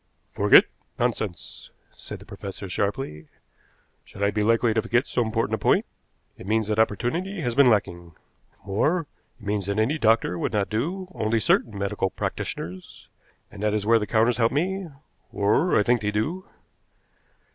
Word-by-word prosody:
"Forget? - - +6 0.3
Nonsense!" 105 - -3 0.3
said - - -9
the - - -15
professor 95 0 -8
sharply. 95 - -3 0.8
"Should 100 - -7
I 100 - +3
be 105 - -1
likely 115 +1 +3
to 110 - +1
forget 120 +4 +1
so 125 - -1
important 110 -1 -1
a - - +2
point? - - +2 0.5
It - - -10
means 110 +1 +1
that 105 +1 -1
opportunity 165 - 0
has 120 -4 -1
been 135 0 +6
lacking. 85 -6 -1 0.5
More, 150 - +1 0.4
it 105 - -14
means 100 -1 -1
that 100 0 -1
any 125 +9 +1
doctor 110 -7 +2
would - - -2
not 105 -1 0
do, 175 - -2
only 110 +1 0
certain 105 0 +1
medical 100 -1 -1
practitioners. 90 0 -6 0.4
And 100 - -10
that 105 0 +1
is 105 -1 -1
where 115 +1 +5
the 105 - -3
counters 115 +1 +2
help 115 0 +3
me 185 +5 -1 0.4
or 105 - +2
I 105 - +4
think 120 +1 +2
they 105 - -1
do." 150 - -2
110 Hz, 170 wpm, -25 LUFS, 100-120 Hz, 0.8 s, Forget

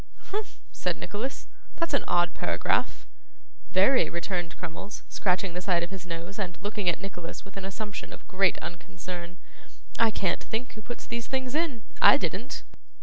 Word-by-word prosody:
Humph!' 420 +1 -3
said - - -1
Nicholas, 235 +7 -3 0.3
'that's 335 -3 0
an 280 - +4
odd 175 0 +4
paragraph.' - - +1 0.7
'Very,' 200 +8 +6
returned 170 -1 -2
Crummles, 180 +4 -5
scratching 185 -1 +1
the 180 - -2
side 180 -2 +3
of 175 - -4
his 185 -2 -6
nose, 170 +4 -5
and 180 -4 -2
looking 205 -2 +1
at 170 - +1
Nicholas 190 -3 -6
with 195 - -12
an 195 -1 -4
assumption 205 +1 -4
of - - -11
great 195 -2 +4
unconcern. 175 - -6 0.6
'I 230 -1 +7
can't 195 -4 +1
think 235 +3 -3
who 215 - -8
puts 240 +3 -6
these 235 0 -3
things 260 -1 -1
in. 300 -8 +1 0.2
I - - +10
didn't. - - -2
195 Hz, 165 wpm, -29 LUFS, 175-220 Hz, 0.7 s, I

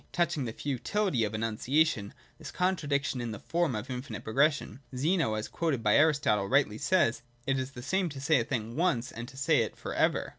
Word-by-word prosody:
Touching 170 -5 0
the 115 - -3
futility 140 - -1
of 105 +1 -4
enunciating 115 +1 +1 0.3
this - - -8
contradiction 145 -8 0
in 120 - -3
the 110 - -5
form 170 -7 0
of 105 +3 -4
infinite 125 -3 -6
progression, 140 0 +1 0.2
Zeno, 150 - +1
as 110 0 -3
quoted 150 -9 -1
by 105 - +4
Aristotle, 145 -10 +3
rightly 130 -6 +2
says, 170 -13 +2
' 120 0 -35
It 135 -1 +1
is 130 0 -3
the 120 - -8
same 190 +5 0
to 140 -2 -8
say 140 +1 +3
a - - +1
thing 115 -2 -3
once, 155 -8 +1
and 120 +1 -7
to 135 0 -13
say 140 +1 +3
it 115 - -1
for - - -5
ever.' - - +1
135 Hz, 210 wpm, -30 LUFS, 115-155 Hz, 0.3 s, by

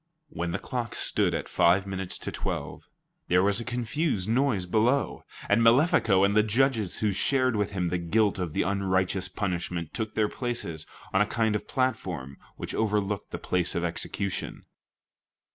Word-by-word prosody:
When 90 - -3
the 90 - -1
clock 120 +1 -4
stood - - +2
at - - -3
five 95 +3 +3
minutes 95 -2 -3
to - - -5
twelve, - - -4 0.5
there 90 +1 +4
was 100 +2 +2
a - - -4
confused 120 - -1
noise 115 -5 +1
below, 115 +9 +1 0.3
and 115 - +3
Malefico 115 - +4
and 100 +1 +3
the 110 - +6
judges 110 -2 +1
who 105 - +3
shared 130 +4 +1
with 105 -1 -1
him 90 -3 -1
the 90 +1 -1
guilt 100 +4 +1
of 85 -4 -3
the - - +1
unrighteous 95 0 0
punishment 90 -4 -3
took 110 -3 -4
their 105 -1 +2
places 105 -11 -4 0.3
on 95 - +4
a 105 - +3
kind 110 -1 +1
of 105 - -4
platform 90 - -2 0.2
which - - -5
overlooked 105 -2 -1
the - - -5
place 90 -2 0
of 85 - -1
execution. 90 +3 -3
100 Hz, 170 wpm, -27 LUFS, 90-115 Hz, 0.5 s, the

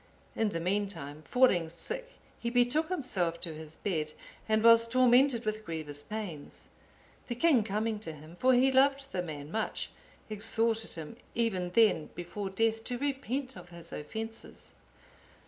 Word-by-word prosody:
In 220 -1 +1
the 170 - -3
meantime, 180 -5 -2
falling 190 -11 +4
sick - - -5 0.3
he 235 - -1
betook 245 +7 +3
himself 190 - -1
to 165 -3 +1
his 155 0 -9
bed, 155 -6 -2 0.4
and 220 0 +3
was 230 0 +7
tormented 250 0 +4
with 215 0 -2
grievous 155 -5 -5
pains. 185 -5 -6 0.6
The 240 - -3
king 260 -3 +4
coming 215 +1 -1
to 205 -6 -6
him 155 +3 -12
(for 255 +6 +4
he 260 +2 +5
loved 275 +1 +3
the 180 - -1
man 150 -3 -7
much) 220 +2 -2 0.4
exhorted 220 +1 0
him, 165 +7 -7 0.2
even 195 -7 0
then, 190 -5 +3
before 190 +3 -5
death, 225 +3 +1
to 245 - -2
repent 270 -1 -2
of 180 -1 -11
his 170 -1 -10
offences. 220 +9 -7
215 Hz, 150 wpm, -31 LUFS, 170-245 Hz, 0.6 s, was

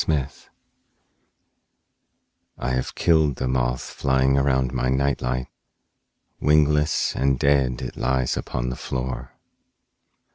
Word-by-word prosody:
Moth 70 -4 -2 2.1
Terror 65 - -2
I - - 0
HAVE 65 - -2
killed 80 -5 +3
the 65 - -3
moth 65 -1 0
flying 65 0 +1
around 65 -2 +1
my 65 0 0
night 70 +1 +1
light; 65 +1 -1 0.9
wingless 75 0 +2
and 70 0 +1
dead 70 -2 +1
it - - -6
lies 65 -1 0
upon - - -3
the 65 - -4
floor. 65 -1 -5
65 Hz, 115 wpm, -23 LUFS, 65-70 Hz, 2.1 s, killed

